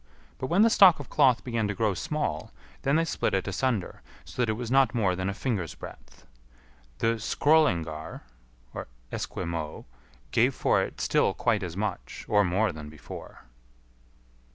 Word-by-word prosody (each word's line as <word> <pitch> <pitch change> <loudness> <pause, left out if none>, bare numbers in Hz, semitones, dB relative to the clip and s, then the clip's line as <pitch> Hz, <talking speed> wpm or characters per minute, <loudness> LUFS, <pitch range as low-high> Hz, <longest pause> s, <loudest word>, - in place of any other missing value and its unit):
But 130 - -3
when 180 +7 +4
the 230 - +5
stock 185 -7 +7
of 145 - -9
cloth 130 -5 +4
began 115 -4 -1
to 105 - -3
grow 110 0 +1
small, 150 - -3 0.3
then 140 +2 +1
they 165 +1 +3
split 160 - -1
it 95 - -1
asunder, 110 0 -1 0.2
so - - -5
that 120 - +1
it - - +2
was 120 +1 -5
not 135 -1 +4
more 100 -6 +2
than 95 +1 -2
a - - -2
finger's 100 - -2
breadth. - - -12 0.7
The 115 - +1
Skrœlingar 85 - +1 0.9
{Esquimaux) 85 -3 -4 0.5
gave - - +3
for - - +2
it - - -5
still - - +2
quite 105 - +1
as 90 -2 -5
much, 105 -2 -4
or 105 -1 +4
more 95 +3 +1
than 75 -2 -9
before. 75 -5 -11
105 Hz, 160 wpm, -27 LUFS, 90-130 Hz, 0.9 s, stock